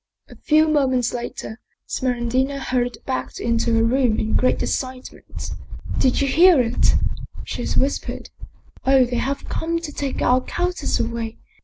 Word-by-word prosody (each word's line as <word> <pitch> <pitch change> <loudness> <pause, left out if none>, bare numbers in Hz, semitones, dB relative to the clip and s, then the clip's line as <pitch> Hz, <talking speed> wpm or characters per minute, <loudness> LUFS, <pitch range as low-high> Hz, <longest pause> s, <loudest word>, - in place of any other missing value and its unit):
A - - -12
few 310 +1 +3
moments 260 -5 +2
later, 235 -1 -6 0.3
Smeraldina 255 +2 -1
hurried 245 -2 -1
back 260 -1 -3
into 230 0 +1
her 225 - +3
room 240 -1 +2
in 220 - -1
great 255 - +2
excitement. 255 -1 -5 0.2
" - - -6
Did 255 - +3
you 280 - +2
hear 335 +3 +6
it? 235 -2 +2 0.2
" - - -11
she - - -4
whis 275 +2 +1
pered. - - -7 0.3
" - - -27
Oh! 265 -1 +6
they 245 0 -2
have 275 +3 -2
come 335 +1 -1
to 335 -2 -5
take 280 -2 -3
our 255 +1 +4
countess 360 +6 -1
away 230 -1 -3
255 Hz, 165 wpm, -22 LUFS, 240-280 Hz, 0.3 s, hear